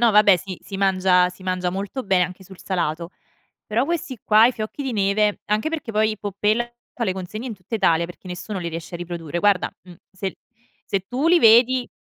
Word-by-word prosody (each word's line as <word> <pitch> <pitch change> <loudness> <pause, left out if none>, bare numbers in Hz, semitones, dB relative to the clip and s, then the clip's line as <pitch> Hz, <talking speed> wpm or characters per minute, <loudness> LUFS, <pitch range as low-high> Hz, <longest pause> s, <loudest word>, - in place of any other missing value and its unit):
No 235 -1 +5
vabbè, 205 -3 +6
si 185 0 -8
si 195 - -7
mangia 185 -2 +3
si 180 +1 -13
mangia 185 -1 -1
molto 200 +8 -4
be 190 -2 +2
anche 185 +2 -5
sul 190 0 -14
salato. 170 -2 -2 0.6
Però 230 +5 +1
questi 295 -6 -3
qua, 215 +2 +6
i 250 - +2
fiocchi 220 +5 -5
di 265 -2 -3
neve 205 0 +1
anche 215 +7 0
perché 315 -7 -4
poi 215 0 +1
Poppella 210 +3 0 0.3
fa 235 - -2
le 190 - 0
consegne 190 +6 -6
in 230 - -4
tutta 195 +3 -8
Italia, 170 -5 +3
perché 175 +2 -12
nessuno 185 +3 -5
li 170 - -3
riesce 165 +1 -7
a 170 - -4
riprodurre; 170 -2 -5
guarda, 205 -2 +2
mhmm, 175 -2 -13 0.2
se 190 0 -5 0.5
se 195 - -1
tu 260 +5 -1
li 350 +1 +6
vedi 245 0 +5
200 Hz, 210 wpm, -22 LUFS, 180-225 Hz, 0.6 s, vabbè